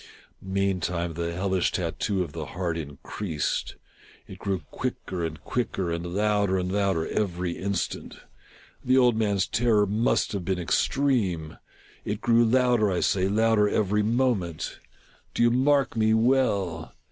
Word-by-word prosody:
Mean 95 0 0
time 85 -1 -2
the 85 +1 -3
hellish 95 +1 0
tattoo 90 +3 -1
of 85 - -8
the - - -5
heart 90 -3 -1
increased. 80 +2 -4 0.5
It 95 - -11
grew 95 -2 -2
quicker 95 -8 -4
and 80 -2 -4
quicker, 95 -8 -2
and 85 +1 -4
louder 105 -2 +2
and 90 0 -2
louder 95 -5 +1
every 90 -3 -1
instant. 95 +1 -3 0.7
The 130 +1 +3
old 125 -3 +5
man's 100 -4 +1
terror 115 -3 +2
must 105 +6 +1
have 100 -4 -3
been 95 +1 -1
extreme! 90 - 0 0.4
It - - -3
grew 115 0 +4
louder, 120 -2 +3
I 90 - 0
say, 95 -1 +2
louder 110 0 +3
every 105 0 +1
moment! 110 -7 -1 0.3
— - - -32
do - - +2
you 120 - +5
mark 135 +2 +2
me 110 0 +3
well 105 -9 +1
100 Hz, 145 wpm, -26 LUFS, 90-115 Hz, 0.7 s, old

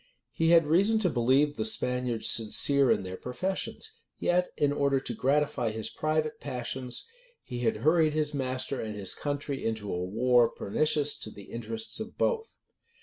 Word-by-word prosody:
He 165 0 +1
had 165 -2 +6
reason 195 +9 +3
to 190 -6 +2
believe 135 +5 +2
the 110 - 0
Spaniards 125 +1 +1
sincere 135 +4 +3
in - - +2
their 95 0 -6
professions; 190 - -4 0.2
yet, 180 +1 +1
in 145 -1 +2
order 140 -1 +2
to 125 - -5
gratify 135 -1 +1
his 110 0 -5
private 155 0 -1
passions, 125 0 -3 0.4
he 125 -3 -6
had 115 -2 0
hurried 160 -1 +4
his 150 -1 -1
master 130 -1 -2
and 110 -1 -5
his 100 -3 0
country 145 -1 -3
into 110 -3 -2
a 90 0 -2
war 120 +5 +3
pernicious 150 +6 +1
to - - -7
the 100 -1 -12
interests 115 - -2
of 220 +1 -7
both. 450 -2 -1
135 Hz, 165 wpm, -29 LUFS, 115-155 Hz, 0.4 s, had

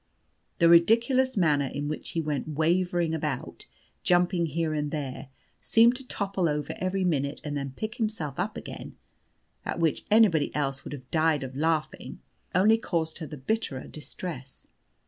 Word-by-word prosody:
The 170 - +5
ridiculous 230 +9 +4
manner 150 -6 +3
in 145 +2 -4
which 155 - -4
he 165 - -1
went 150 -2 -2
wavering 170 +2 +1
about, 150 -5 -4 0.3
jumping 175 -1 +2
here 160 +1 -1
and 150 -1 -1
there, 135 -3 -5 0.3
seeming 230 +2 +5
to 255 +1 -7
topple 195 -6 -1
over 150 0 -2
every 185 +1 0
minute 145 -5 0
and 145 -1 -4
then 140 -2 -4
pick 215 +2 -5
himself 210 - -3
up - - -2
again - - -8 0.7
(at - - -3
which 165 -3 +1
anybody 205 -8 +5
else 135 -2 -1
would - - -7
have 130 -2 -10
died 155 -3 +2
of 130 0 -7
laughing), 155 +1 -1 0.4
only 215 +5 +5
caused 160 -6 -2
her 160 - -5
the 150 - -8
bitterer 140 -2 -2
distress. 145 -2 -7
160 Hz, 160 wpm, -27 LUFS, 145-185 Hz, 0.7 s, The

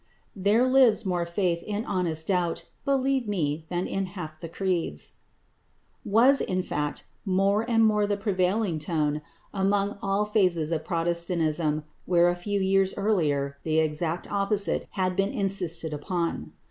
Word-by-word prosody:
"There 205 +5 +3
lives 255 -5 +4
more 175 -2 -1
faith 170 -1 0
in 210 +4 -3
honest 170 -5 -1
doubt, 180 -3 0 0.2
Believe 270 -2 +1
me, 160 -5 -1
than 175 0 -1
in 195 -1 -2
half 165 -5 -8
the 165 - -7
creeds" 170 - -2 0.9
was, 235 +7 +4
in 185 0 -1
fact, 150 -4 -3 0.2
more 195 +1 +2
and 225 -1 +4
more 210 -1 +3
the 205 0 0
prevailing 195 -3 0
tone 150 -1 -1 0.3
among 200 +1 0
all 195 +1 +1
phases 180 -7 +1
of 160 -1 -2
Protestantism 165 -2 0 0.2
where 175 -1 +4
a 175 - 0
few 200 +3 -2
years 195 0 +2
earlier 145 -9 0
the 160 0 0
exact 160 +2 0
opposite 200 0 0
had 185 -2 0
been 195 +1 +1
insisted 175 -6 -2
upon. 170 +2 -3
185 Hz, 145 wpm, -26 LUFS, 165-205 Hz, 0.9 s, lives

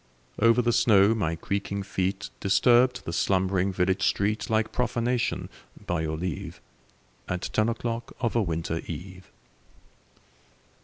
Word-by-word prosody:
Over 115 +2 +4
the 120 0 +2
snow 110 -3 +5
my 85 -7 -1
creaking 100 +3 -3
feet 95 +1 -2
Disturbed 120 +5 +3
the 85 - -4
slumbering 95 +2 +1
village 95 +1 0
street 105 +2 0
Like 110 0 +1
profanation, 120 0 -1 0.4
by 90 -2 -1
your 80 0 -2
leave, 85 -3 -5 0.7
At 90 0 -3
ten 110 +1 +2
o'clock 115 0 -4
of 115 -2 -1
a 115 - +3
winter 80 -3 -2
eve. 90 +3 -8
100 Hz, 125 wpm, -26 LUFS, 90-115 Hz, 0.7 s, snow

